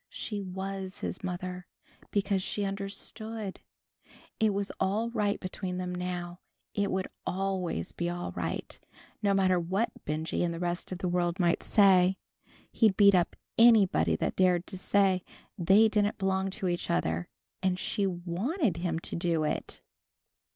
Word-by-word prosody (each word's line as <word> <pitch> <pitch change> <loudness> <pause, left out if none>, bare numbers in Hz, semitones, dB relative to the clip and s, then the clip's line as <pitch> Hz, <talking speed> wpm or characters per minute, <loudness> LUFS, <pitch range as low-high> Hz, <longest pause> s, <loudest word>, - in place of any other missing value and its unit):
She 210 -2 -4
was 190 0 -5
his - - -4
mother, 180 0 -4 0.4
because 200 -1 +1
she 205 +2 -2
understood! 200 +1 -5 0.8
It 220 -1 +4
was 200 0 -2
all 220 +5 0
right 210 -3 0
between 185 -1 -4
them 180 0 -3
now. 180 -1 -4 0.3
It 205 -1 0
would 190 0 -1 0.2
always 185 - -2
be 175 0 -2
all 175 - -4
right, 85 -2 -4 0.4
no 200 -1 +3
matter 185 -2 +3
what 195 +7 0
Benjy 155 +2 -2
and 170 -1 -1
the - - -6
rest 175 +1 -2
of 185 - -3
the 185 - -2
world 175 +1 0
might 170 -2 +2
say. 190 -2 +5 0.5
He'd 215 -5 +3
beat 200 -1 +7
up 180 -2 +2 0.2
anybody 195 - +6
that - - -1
dared 180 -1 +3
to 190 - -6
say 190 -2 +2 0.3
they 195 +5 +5
didn't 210 -1 +1
belong 190 0 0
to 190 0 -3
each 175 -1 -2
other, 80 +1 0 0.3
and 185 -1 +1
she 200 +1 0
wanted 185 - -1
him 170 -1 -1
to - - -5
do 170 -2 +1
it! 150 - -3
185 Hz, 155 wpm, -30 LUFS, 175-200 Hz, 0.8 s, beat